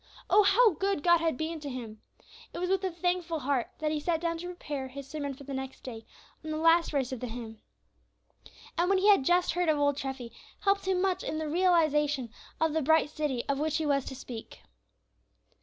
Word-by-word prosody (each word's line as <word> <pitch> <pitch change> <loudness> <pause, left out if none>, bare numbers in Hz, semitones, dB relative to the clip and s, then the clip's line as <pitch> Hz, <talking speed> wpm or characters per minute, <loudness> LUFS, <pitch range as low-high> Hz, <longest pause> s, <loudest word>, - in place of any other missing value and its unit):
Oh, 420 - +7
how 425 +3 +5
good 385 -1 -1
God 345 -1 +5
had 325 -5 0
been 320 +1 -3
to 290 -1 -6
him! 230 -4 -7 0.5
It - - -4
was 360 +1 -1
with 385 0 +1
a 380 - +1
thankful 345 -2 -1
heart 260 -2 0
that 305 -1 -1
he 305 - -1
sat 325 +2 0
down 335 0 -2
to 355 - -6
prepare 295 -6 -5
his 275 +1 -9
sermon 285 -2 -4
for 280 - -12
the 275 0 -7
next 265 0 -6
day, 225 -3 -8 0.4
on 315 - -6
the 310 - -2
last 330 +1 +4
verse 270 -4 -1
of 260 - -4
the 250 - -4
hymn. 225 -2 -8 1.2
And 350 +1 +2
what 390 - +4
he 395 +3 +4
had 400 -9 +6
just 355 +4 +3
heard 355 -1 0
of 305 - +3
old 285 -1 +2
Treffy 265 -4 -5 0.3
helped 395 -1 +1
him 375 -1 +1
much 380 -2 0
in 310 - -3
the 315 0 -2
realization 300 -7 +2 0.3
of 320 -1 +2
the 320 - +1
bright 315 +1 +3
city 290 -6 -2
of 280 0 0
which 310 0 0
he 320 - -1
was 280 -2 +2
to 265 - -6
speak. 240 -3 -9
310 Hz, 225 wpm, -29 LUFS, 270-350 Hz, 1.2 s, Oh